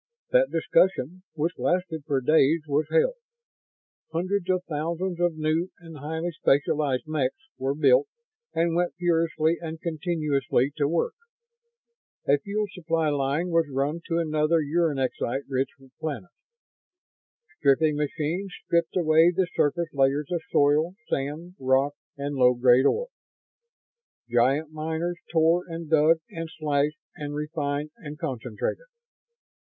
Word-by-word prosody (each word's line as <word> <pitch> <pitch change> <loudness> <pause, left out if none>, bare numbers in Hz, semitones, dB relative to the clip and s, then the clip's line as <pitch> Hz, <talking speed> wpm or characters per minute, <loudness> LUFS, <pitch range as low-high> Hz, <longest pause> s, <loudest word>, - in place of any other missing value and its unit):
That - - +4
discussion, 185 -1 +1
which 160 +3 -2
lasted 175 -4 -1
for 135 -2 +1
days, 155 +3 +4
was 145 +2 +1
held. - - +2 0.9
Hundreds 185 +3 -1
of 185 -1 +1
thousands 170 +3 -3
of 175 -2 +1
new 155 +3 0
and 165 -3 -11
highly 160 +4 -3
specialized 145 -3 +1
mechs 150 -4 -1 0.2
were 135 +2 -1
built 140 -2 +4 0.4
and 165 0 +1
went 175 0 0
furiously 165 -2 +1
and 160 -1 -6
continuously 150 -5 0
to 145 -2 +2
work. 165 +2 0 1.1
A 140 +1 +4
fuel 210 +4 -2
supply 165 -3 0
line 145 +4 0
was 165 -3 +2
run 140 +5 -1
to 165 - 0
another 155 0 +2
uranexite 140 -4 0
rich 135 0 0 0.3
planet. 160 +3 -5 1.3
Stripping 150 +2 +3
machines 155 +6 -2
stripped 170 +1 +1
away 160 -1 +5
the 185 +1 +1
surface 165 +3 0
layers 140 +2 +1
of 175 -2 0
soil, 150 +5 +3 0.2
sand, 150 +6 -3
rock 130 +2 +2 0.2
and 140 +1 -3
low 125 -2 +4
grade 125 +2 +5
ore. - - 0 1.2
Giant 135 +6 +2
miners 160 +3 -3
tore 165 +2 +3
and 165 -2 -7
dug 160 +1 +5
and 165 -1 -5
slashed 150 -1 0 0.2
and 145 -1 -5
refined 150 -1 -3
and 150 -1 -8
concentrated. 130 - -4
155 Hz, 125 wpm, -26 LUFS, 145-170 Hz, 1.3 s, away